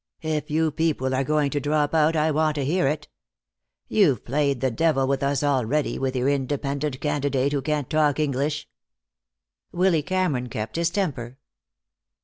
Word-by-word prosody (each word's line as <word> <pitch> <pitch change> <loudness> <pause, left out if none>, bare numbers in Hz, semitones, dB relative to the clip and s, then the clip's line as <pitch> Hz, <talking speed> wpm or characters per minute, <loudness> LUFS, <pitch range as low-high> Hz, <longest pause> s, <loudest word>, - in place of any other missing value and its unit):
If 155 -1 -2
you 160 +1 +1
people 145 -4 0
are 130 +1 +1
going 150 0 +1
to 145 - 0
drop 145 +1 0
out, 160 0 +3
I 155 0 +2
want 155 0 +1
to 140 -3 -1
hear 170 +1 +1
it. 150 +1 -2 0.8
You've 165 - +2
played 140 0 0
the 130 0 0
devil 145 +1 +2
with 135 0 0
us 140 +1 0
already, 140 +1 0
with 130 0 -1
your 125 +1 0
independent 140 0 -1
candidate 140 -2 0
who 140 - 0
can't 150 -1 -1
talk 150 -2 +2
English." 150 +1 -1 1.0
Willy 175 -3 +2
Cameron 155 -7 -1
kept 110 0 -5
his 170 0 +1
temper. 140 - -3
145 Hz, 160 wpm, -24 LUFS, 135-155 Hz, 1.0 s, out